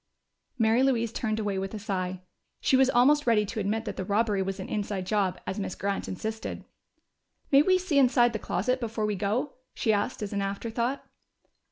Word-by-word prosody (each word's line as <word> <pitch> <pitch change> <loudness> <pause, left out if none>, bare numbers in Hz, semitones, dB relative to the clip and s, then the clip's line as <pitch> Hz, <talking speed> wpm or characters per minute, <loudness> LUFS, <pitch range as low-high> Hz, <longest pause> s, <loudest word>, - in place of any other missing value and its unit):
Mary 225 +1 +3
Louise 235 -4 +1
turned 220 -2 -1
away 205 -3 -1
with 195 +3 -4
a - - -3
sigh. 185 -3 -3 0.4
She - - +2
was 265 0 +5
almost 270 +3 +4
ready 215 -3 +4
to 205 +2 -5
admit 215 +2 -1
that - - -5
the - - -2
robbery 205 +1 +1
was 195 +1 -3
an 190 - -5
inside 200 -3 -3
job, 195 -2 0
as 190 - -3
Miss 195 -2 -3
Grant 200 0 -2
insisted. 220 +4 -5 0.9
"May 275 0 +7
we 370 +4 +4
see 355 -6 +1
inside 245 -2 +4
the 220 - -2
closet 250 +10 -1
before 225 -2 -2
we 210 -1 -1
go?" 215 +9 -1 0.2
she 220 -4 +1
asked 210 +2 -1
as 205 - -4
an 200 - -1
afterthought. 230 +6 -2
215 Hz, 195 wpm, -28 LUFS, 200-245 Hz, 0.9 s, May